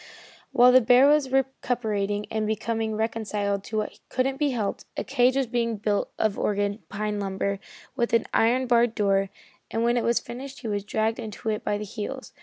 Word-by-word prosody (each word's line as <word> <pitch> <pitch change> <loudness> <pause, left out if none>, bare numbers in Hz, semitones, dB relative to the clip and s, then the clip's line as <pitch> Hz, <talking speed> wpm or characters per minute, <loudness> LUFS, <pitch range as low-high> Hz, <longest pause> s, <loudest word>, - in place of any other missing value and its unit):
While 250 -2 +6
the 255 +1 +7
bear 250 +3 +6
was 290 -3 +3
recuperating 220 -6 -1
and 220 -1 -1
becoming 220 0 -1
reconciled 210 -3 -1
to 220 - -4
what 215 - -3
couldn't 265 +1 0
be 295 0 +1
helped, 225 -6 -2
a - - -1
cage 255 -1 +2
was 270 -1 +2
being 230 -1 -1
built 205 0 -1
of 215 -2 0
Oregon 205 +1 0
pine 210 0 -2
lumber 200 0 -2 0.4
with 240 -3 0
an 230 - +3
iron 245 +3 +3
barred 240 -1 +3
door, 195 -2 +2 0.4
and 225 - -1
when 240 +1 +2
it 240 - +1
was 235 0 +2
finished 265 +3 -8
he 235 - -5
was 205 -2 -2
dragged 220 +3 -1
into 220 -1 -5
it 215 -1 -2
by 205 - 0
the 210 - -5
heels. 225 +5 -6
225 Hz, 195 wpm, -26 LUFS, 210-245 Hz, 0.4 s, the